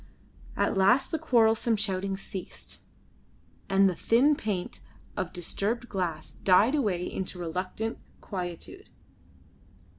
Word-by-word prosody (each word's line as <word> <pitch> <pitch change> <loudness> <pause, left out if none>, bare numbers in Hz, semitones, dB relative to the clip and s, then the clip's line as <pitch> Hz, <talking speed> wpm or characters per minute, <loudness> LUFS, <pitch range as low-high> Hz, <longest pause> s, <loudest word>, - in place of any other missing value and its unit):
At - - +1
last 230 +8 +4
the 320 - -1
quarrelsome 230 -5 +3
shouting 195 -2 -1
ceased, 195 -1 -7 0.9
and 195 0 +5
the 185 - +1
thin 255 - +3
plaint 200 -8 -3 0.4
of 180 - -2
disturbed 210 +7 -2
glass 175 -5 -3
died 200 +7 +5
away 205 -12 +1
into 185 -1 -4
reluctant 185 +6 -3 0.2
quietude. 185 - -6
195 Hz, 110 wpm, -28 LUFS, 185-230 Hz, 0.9 s, and